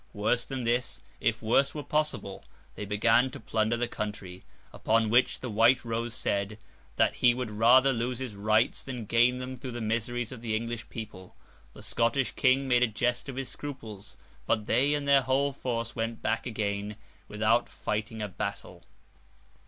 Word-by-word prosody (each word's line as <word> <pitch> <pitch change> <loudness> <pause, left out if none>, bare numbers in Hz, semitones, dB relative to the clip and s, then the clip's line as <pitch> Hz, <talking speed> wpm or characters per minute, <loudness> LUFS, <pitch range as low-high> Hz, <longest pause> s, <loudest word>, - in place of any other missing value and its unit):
Worse 115 +3 +1
than 135 -2 -4
this, 120 +2 0 0.2
if 110 0 0
worse 135 +6 +2
were 150 - -4
possible, 150 -11 -2 0.3
they 105 - -6
began 115 +5 +3
to - - -9
plunder 110 +1 0
the 120 0 0
country; 105 -5 -6 0.3
upon 110 -1 +1
which 125 +2 +3
the 125 - -4
White 120 +4 +4
Rose 115 0 -2
said, 100 +1 -1 0.4
that - - +3
he 120 -1 +4
would 125 -3 -4
rather 125 +5 +5
lose 120 +1 -2
his 130 -4 -5
rights, 110 +3 +1
than 125 -4 -6
gain 120 +4 +3
them 130 0 -6
through 125 0 -7
the 120 - -4
miseries 115 +1 -2
of 125 -3 -8
the 110 -2 -1
English 115 0 -4
people. 105 -5 -9 0.4
The 105 - -12
Scottish 115 +5 +1
King 135 +1 +2
made 125 -1 +3
a 125 - +5
jest 125 +4 -1
of 135 - -6
his 135 -1 -4
scruples; 115 -9 -8 0.3
but 110 -2 +1
they 135 +7 +3
and 145 -1 -3
their 140 -1 +6
whole 135 +2 +1
force 115 -3 -3
went 115 0 -3
back 115 +2 -1
again 105 -2 -3 0.3
without 110 +3 +1
fighting 110 +1 -3
a - - -2
battle. 95 - -6
115 Hz, 175 wpm, -29 LUFS, 110-125 Hz, 0.4 s, their